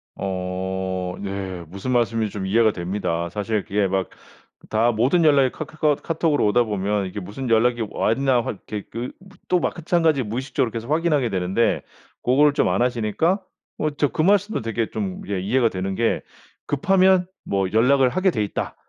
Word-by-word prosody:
어 95 -1 -3
네. 95 -3 -5
무슨 100 +9 -5
말씀인지 115 -3 +1
좀 100 -2 -4
이해가 110 +3 +3
됩니다. 85 -2 -2
사실 105 +3 -2
그게 100 -1 0
막 95 -1 -1 0.6
다 115 +2 +3
모든 125 +10 +2
연락이 140 -4 +4
카카커 155 -1 0
카톡으로 160 -4 +1
오다 120 +4 +4
보면 105 -2 -1
이게 95 +2 -5
무슨 115 +7 -6
연락이 120 +1 +3
왔나 130 +2 +2
확 110 - -6
게 105 -2 -5
그 120 +3 -4 0.4
또 180 -1 +2
마찬가지 165 -3 +1
무의식적으로 125 +2 -2
계속 115 +4 -5
확인하게 155 -6 +2
되는데 95 +3 +1 0.4
고거를 145 +4 +4
좀 - - +2
안 - - +1
하시니까 125 - +1 0.4
어 155 - 0
진짜 145 0 +1
그 155 - -1
말씀도 205 +4 +2
되게 115 0 -2
좀 100 -4 -4
예 100 -2 -1
이해가 115 +5 +2
되는 95 0 -3
게 115 +2 +1 0.5
"급하면 185 +4 +3 0.2
뭐 95 -2 -1
연락을 130 +4 +4
하게 185 +7 +2
돼 110 -7 -1
있다. 100 - -4
115 Hz, 340 characters per minute, -22 LUFS, 100-140 Hz, 0.6 s, 연락이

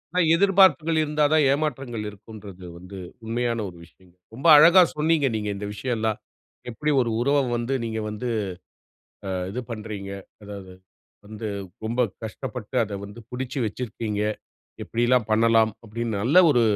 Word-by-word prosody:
அ - - 0 0.2
எதிர்பார்ப்புகள் 185 -4 +4
இருந்தா 150 0 0
தான், 155 -2 +5
ஏமாற்றங்கள் 135 -6 -2
இருக்கும்ன்றது 100 -3 -12
வந்து 90 +2 -11 0.3
உண்மையான 115 0 -1
ஒரு 85 - -14
விஷயம். 90 +1 -24 0.2
ரொம்ப 145 +7 -1
அழகா 170 +5 +8 0.2
சொன்னீங்க 155 -2 +2
நீங்க 105 -1 -2
இந்த 105 +1 -5
விஷயம்லாம். 110 -1 -2 0.5
எப்டி 150 +6 -2
ஒரு 115 -2 -1
உறவ 140 +3 +2 0.2
வந்து 120 +3 -2
நீங்க 110 -1 -3
வந்து 105 +4 -5 1.0
அ - - -3 0.2
இது 125 +5 -4
பண்றீங்க? 105 -3 -6 0.3
அதாவது, 100 -2 -9 0.5
வந்து 110 +1 -7 0.4
ரொம்ப 120 +3 -1 0.2
கஷ்டப்பட்டு 110 +2 -6
அத 100 -1 -6
வந்து 100 +3 -11
பிடிச்சு 125 +2 -4
வச்சிருக்கீங்க. 105 -2 -4 0.6
எப்டியெல்லாம் 120 0 +1
பண்ணலாம்? 110 0 +4
அப்டின்னு 115 -1 -3
நல்ல 140 +10 +1
ஒரு 120 -4 +3
115 Hz, 135 wpm, -24 LUFS, 105-135 Hz, 1.0 s, அழகா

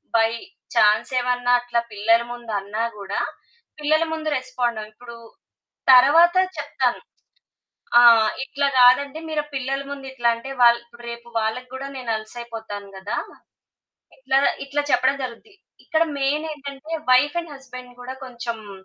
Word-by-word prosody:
By 225 0 +4 0.4
చాన్సేమన్నా 245 +3 +2
అట్లా 240 -1 -1
పిల్లల 220 +3 +3
ముందన్నా 215 -3 -4 0.2
గూడా 200 -1 -4 0.6
పిల్లల 310 +2 +2
ముందు 315 -1 -3
రెస్పాండ 245 -2 -2
ఇప్పుడు 235 +2 -12 0.8
తరువాత 320 +8 +7 0.2
చెప్తాను. - - -1 1.0
ఆ! - - +8 0.4
ఇట్లా 280 0 -1
గాదండి 265 +4 +5
మీరు 300 -1 -1
పిల్లల 270 +1 -2
ముందు 280 -1 -7
ఇట్లా 240 -2 +1
అంటే 250 +4 -8
వాళ్ 235 0 +6 0.3
రేపు 235 0 -8
వాళ్ళకి 220 +3 -2
గూడా 270 +1 -5
నేను 245 -3 -4
అలుసయిపోతాను 220 -2 -8
గదా! 190 +2 -4 1.0
ఇట్లా 270 - 0 0.3
ఇట్లా 285 +1 -1
చెప్పడం 260 +2 +3
జరుగుద్ది. 255 - -8 0.3
ఇక్కడ 320 0 +2 0.2
మెయినేంటంటే 290 0 -3 0.2
వైఫ్ 290 +5 +4
అండ్ 330 -3 -10
హస్బండ్ 250 -2 -12
గూడా 260 +1 -7
కొంచెం 235 -4 -7
250 Hz, 120 wpm, -22 LUFS, 235-275 Hz, 1.0 s, ఆ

